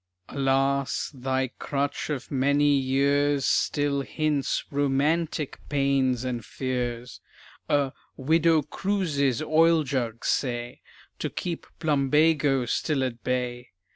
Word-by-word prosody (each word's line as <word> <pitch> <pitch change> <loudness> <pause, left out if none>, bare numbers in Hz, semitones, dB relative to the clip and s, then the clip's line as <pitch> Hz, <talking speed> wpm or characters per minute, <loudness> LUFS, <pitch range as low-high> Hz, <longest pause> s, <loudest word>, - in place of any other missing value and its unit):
Alas! 135 -1 0
thy 130 -1 -1
crutch 140 +1 -2
of 140 -4 -4
many 140 +2 +3
years 140 +1 +2
Still 145 -1 +1
hints 150 0 -1
"romantic" 145 +2 0
pains 135 -3 +1
and 120 -3 -3
fears; 125 -1 -4 0.5
A 140 -2 +1 0.2
"Widow 160 +2 +3
Cruise's 150 - -1
oil 160 +1 +4
jug" 120 -5 -3
say, 120 -2 -1 0.4
To - - -2
keep 170 -2 -5
"plumbago" 145 -2 +2
still 135 +3 0
at 120 -3 -4
bay! 125 -1 -3
140 Hz, 105 wpm, -26 LUFS, 130-150 Hz, 0.5 s, oil